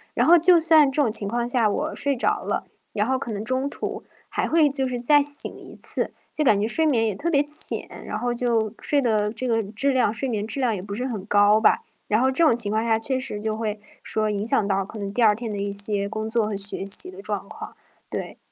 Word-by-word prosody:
然 -, -, +2 dB
后 345 Hz, -, +8 dB
就 345 Hz, +1 st, +5 dB
算 315 Hz, -3 st, +4 dB
这 290 Hz, -, 0 dB
种 245 Hz, -6 st, +1 dB
情 205 Hz, -1 st, 0 dB
况 235 Hz, +2 st, -2 dB
下 240 Hz, -3 st, +2 dB
我 -, -, -3 dB
睡 280 Hz, -1 st, +1 dB
着 245 Hz, -, -1 dB
了， -, -, -2 dB, 0.3 s
然 210 Hz, +1 st, -1 dB
后 260 Hz, 0 st, 0 dB
可 235 Hz, -3 st, -6 dB
能 205 Hz, 0 st, -4 dB
中 260 Hz, +2 st, 0 dB
途 -, -, -6 dB, 0.3 s
还 -, -, -2 dB
会 315 Hz, -2 st, +3 dB
就 270 Hz, -1 st, -1 dB
是 250 Hz, -1 st, -3 dB
再 290 Hz, +5 st, +4 dB
醒 290 Hz, 0 st, -1 dB
一 -, -, -13 dB
次， -, -, +1 dB, 0.2 s
就 305 Hz, -, -1 dB
感 215 Hz, -8 st, +3 dB
觉 215 Hz, -, 0 dB
睡 320 Hz, +7 st, +4 dB
眠 230 Hz, -7 st, +2 dB
也 210 Hz, -, -2 dB
特 340 Hz, -, -3 dB
别 280 Hz, -, +3 dB
浅， 295 Hz, +1 st, -1 dB
然 -, -, -4 dB
后 245 Hz, 0 st, -2 dB
就 230 Hz, -3 st, 0 dB
睡 290 Hz, -1 st, +1 dB
的 215 Hz, -4 st, 0 dB
这 245 Hz, +3 st, -3 dB
个 225 Hz, -2 st, 0 dB
质 250 Hz, +8 st, +1 dB
量 250 Hz, -5 st, +1 dB
睡 265 Hz, +4 st, -1 dB
眠 210 Hz, -3 st, -2 dB
质 255 Hz, -, -2 dB
量 245 Hz, -4 st, +1 dB
也 -, -, -5 dB
不 200 Hz, +1 st, -8 dB
是 250 Hz, +5 st, -3 dB
很 215 Hz, -7 st, -6 dB
高 205 Hz, +1 st, +4 dB
吧。 220 Hz, -, +3 dB, 0.3 s
然 215 Hz, -, +1 dB
后 265 Hz, +1 st, +2 dB
这 335 Hz, -, +1 dB
种 265 Hz, -, +4 dB
情 220 Hz, -3 st, +2 dB
况 220 Hz, +1 st, 0 dB
下 225 Hz, -1 st, +1 dB
确 260 Hz, +3 st, 0 dB
实 230 Hz, -5 st, -4 dB
就 215 Hz, 0 st, -3 dB
会 215 Hz, -2 st, -3 dB, 0.2 s
说 215 Hz, -1 st, -1 dB
影 205 Hz, +1 st, -3 dB
响 215 Hz, -3 st, +1 dB
到 195 Hz, -1 st, 0 dB
可 220 Hz, -, -11 dB
能 200 Hz, -1 st, -5 dB
第 245 Hz, -, -1 dB
二 210 Hz, -2 st, +5 dB
天 230 Hz, -1 st, -6 dB
的 205 Hz, -, -5 dB
一 200 Hz, 0 st, -3 dB
些 200 Hz, 0 st, +2 dB
工 220 Hz, +1 st, -4 dB
作 230 Hz, -1 st, 0 dB
和 215 Hz, -, -4 dB
学 195 Hz, 0 st, -2 dB
习 205 Hz, -, +4 dB
的 385 Hz, +1 st, -11 dB
状 -, -, -4 dB
况， -, -, -10 dB, 0.3 s
对。 -, -, -6 dB
230 Hz, 280 characters per minute, -23 LUFS, 210-270 Hz, 0.3 s, 后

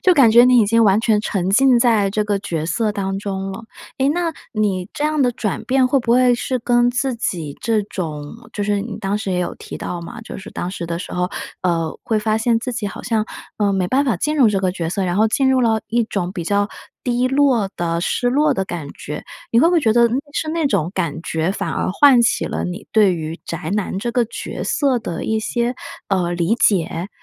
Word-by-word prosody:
就 365 Hz, -, +4 dB
感 265 Hz, -8 st, +6 dB
觉 235 Hz, +2 st, +7 dB
你 250 Hz, 0 st, +5 dB
已 225 Hz, -, +5 dB
经 230 Hz, +3 st, +3 dB
完 200 Hz, +1 st, +4 dB
全 220 Hz, -2 st, +2 dB
沉 190 Hz, -3 st, -1 dB
浸 255 Hz, +4 st, +5 dB
在 230 Hz, -4 st, +3 dB
这 210 Hz, +2 st, 0 dB
个 205 Hz, -1 st, 0 dB
角 165 Hz, -5 st, -3 dB
色 215 Hz, +5 st, 0 dB
当 195 Hz, -1 st, -2 dB
中 195 Hz, -1 st, -4 dB
了。 195 Hz, +4 st, -8 dB, 0.3 s
诶， 265 Hz, -, +2 dB
那 335 Hz, 0 st, -1 dB, 0.2 s
你 200 Hz, -4 st, -1 dB
这 -, -, -4 dB
样 305 Hz, -1 st, +1 dB
的 250 Hz, -2 st, +3 dB
转 215 Hz, -4 st, -3 dB
变 260 Hz, 0 st, +2 dB
会 275 Hz, +2 st, +3 dB
不 235 Hz, -1 st, 0 dB
会 250 Hz, 0 st, +5 dB
是 255 Hz, +1 st, -2 dB
跟 240 Hz, 0 st, +3 dB
自 260 Hz, +2 st, 0 dB
己 165 Hz, -10 st, -3 dB
这 220 Hz, -2 st, +1 dB
种 155 Hz, -7 st, -5 dB, 0.2 s
就 205 Hz, -, -3 dB
是 205 Hz, 0 st, 0 dB
你 215 Hz, 0 st, -6 dB
当 205 Hz, 0 st, -1 dB
时 195 Hz, -3 st, -3 dB
也 180 Hz, -, 0 dB
有 175 Hz, -, -2 dB
提 -, -, -8 dB
到 175 Hz, -, -5 dB
嘛， 230 Hz, +8 st, -8 dB
就 220 Hz, -, -8 dB
是 200 Hz, +3 st, -10 dB
当 175 Hz, -, -4 dB
时 175 Hz, -3 st, -5 dB
的 170 Hz, 0 st, -3 dB
时 -, -, -7 dB
候， 180 Hz, 0 st, -1 dB, 0.3 s
呃， 165 Hz, -3 st, 0 dB
会 220 Hz, -, 0 dB
发 215 Hz, +1 st, +1 dB
现 230 Hz, 0 st, +1 dB
自 250 Hz, +1 st, -4 dB
己 220 Hz, -3 st, -3 dB
好 -, -, -7 dB
像， 220 Hz, -3 st, 0 dB, 0.3 s
呃， 205 Hz, -2 st, +1 dB
没 185 Hz, -2 st, 0 dB
办 275 Hz, +6 st, +2 dB
法 235 Hz, -9 st, +1 dB
进 300 Hz, -, -1 dB
入 250 Hz, -6 st, +6 dB
这 195 Hz, -2 st, 0 dB
个 185 Hz, -, +1 dB
角 170 Hz, -3 st, -3 dB
色， 195 Hz, +3 st, -2 dB
然 180 Hz, +1 st, -1 dB
后 220 Hz, -, +4 dB
进 265 Hz, +4 st, +2 dB
入 260 Hz, -1 st, +3 dB
了 220 Hz, -2 st, +2 dB
一 235 Hz, 0 st, +1 dB
种 185 Hz, -4 st, -3 dB
比 175 Hz, -3 st, -5 dB
较 205 Hz, +3 st, +1 dB, 0.3 s
低 245 Hz, 0 st, +1 dB
落 260 Hz, -6 st, +2 dB
的、 170 Hz, -1 st, -1 dB
失 245 Hz, +7 st, 0 dB
落 290 Hz, +1 st, +3 dB
的 195 Hz, -, -1 dB
感 170 Hz, -5 st, -5 dB
觉。 150 Hz, +1 st, -7 dB, 0.3 s
你 230 Hz, -, +3 dB
会 300 Hz, -, +6 dB
不 350 Hz, -, +3 dB
会 335 Hz, -, +4 dB
觉 220 Hz, -5 st, +3 dB
得 235 Hz, 0 st, +5 dB, 0.2 s
是 315 Hz, -, -2 dB
那 325 Hz, 0 st, -1 dB
种 185 Hz, -, 0 dB
感 165 Hz, -4 st, -2 dB
觉， 160 Hz, +2 st, -1 dB
反 195 Hz, -, -3 dB
而 -, -, -1 dB
唤 255 Hz, +3 st, +6 dB
起 230 Hz, -, +1 dB
了 -, -, -3 dB
你 180 Hz, +4 st, -6 dB
对 210 Hz, -4 st, +5 dB
于 160 Hz, -1 st, -4 dB
宅 160 Hz, -1 st, -5 dB
男 200 Hz, -2 st, -2 dB
这 235 Hz, +3 st, -3 dB
个 245 Hz, -2 st, +2 dB
角 230 Hz, -, -6 dB
色 270 Hz, -5 st, +1 dB
的 170 Hz, -6 st, -5 dB
一 220 Hz, 0 st, 0 dB
些， 240 Hz, +2 st, -1 dB, 0.3 s
呃， 180 Hz, -3 st, 0 dB
理 175 Hz, +5 st, +1 dB
解？ 180 Hz, -5 st, +1 dB
215 Hz, 260 characters per minute, -20 LUFS, 185-245 Hz, 0.3 s, 觉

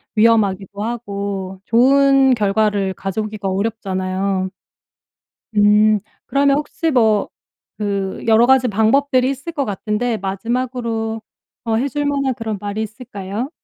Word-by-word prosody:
위험하기도 205 Hz, -3 st, +2 dB
하고 200 Hz, -5 st, -4 dB
좋은 270 Hz, +2 st, +4 dB
결과를 205 Hz, -2 st, +1 dB
가져오기가 210 Hz, +1 st, -4 dB
어렵잖아요. 190 Hz, -2 st, -2 dB, 1.1 s
음. 210 Hz, +1 st, +5 dB, 0.3 s
그러면 280 Hz, +1 st, +2 dB
혹시 315 Hz, +2 st, -2 dB
뭐 220 Hz, -5 st, +2 dB, 0.5 s
그 200 Hz, -2 st, -2 dB
여러 225 Hz, +1 st, +5 dB
가지 260 Hz, -1 st, +4 dB
방법들이 255 Hz, +5 st, +2 dB
있을 275 Hz, +5 st, -6 dB
것 290 Hz, -4 st, -2 dB
같은데 215 Hz, +3 st, -2 dB
마지막으로 225 Hz, +2 st, -3 dB, 0.4 s
어 225 Hz, -, 0 dB
해 250 Hz, +5 st, +1 dB
줄 290 Hz, +2 st, -2 dB
만한 275 Hz, -3 st, 0 dB
그런 220 Hz, -4 st, -4 dB
말이 205 Hz, +2 st, -3 dB
있을까요? 215 Hz, +1 st, -6 dB
220 Hz, 275 characters per minute, -19 LUFS, 200-250 Hz, 1.1 s, 음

